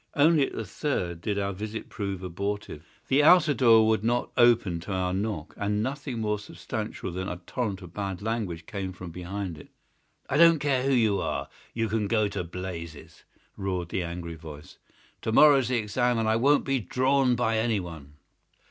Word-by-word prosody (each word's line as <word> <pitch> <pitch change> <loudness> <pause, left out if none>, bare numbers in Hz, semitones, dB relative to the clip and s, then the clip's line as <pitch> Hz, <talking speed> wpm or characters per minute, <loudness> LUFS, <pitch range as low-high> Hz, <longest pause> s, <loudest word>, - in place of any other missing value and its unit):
Only 150 -1 +4
at - - -10
the 115 - -4
third 90 - -3
did 105 +2 -2
our 100 0 -1
visit 105 +3 -6
prove 100 -3 -5
abortive. 100 -3 -4 0.2
The 135 +2 +4
outer 160 -1 +6
door 115 -4 +5
would 110 -2 +2
not 120 +2 0
open 115 -8 +4
to 85 +5 -8
our 90 -1 -1
knock, 100 -5 -3
and 105 +1 0
nothing 135 -1 -4
more 105 -1 -1
substantial 105 - -6
than 95 +2 -4
a 90 - -4
torrent 105 -6 -3
of 90 -1 -12
bad 95 -3 -4
language 100 -7 -3
came 95 -3 -5
from 90 -1 -9
behind 90 -1 -5
it. - - -14 0.6
"I 140 - 0
don't 165 0 +7
care 140 -3 +1
who 135 +1 0
you 110 -5 +3
are. - - -3 0.3
You 115 -1 0
can 110 -1 -1
go 110 0 +2
to 100 -2 -3
blazes!" 85 -3 -8 0.3
roared 90 -3 -3
the 95 - -1
angry 85 -1 -5
voice. 75 -2 -11 0.4
"To 110 - -2
morrow's 140 0 +6
the 125 0 +1
exam, 120 +3 0
and 110 -1 0
I 110 - +3
won't 140 +6 +3
be 135 -1 +1
drawn 130 +4 +2
by 115 -2 +1
anyone." 90 -11 -3
105 Hz, 185 wpm, -27 LUFS, 90-120 Hz, 0.6 s, don't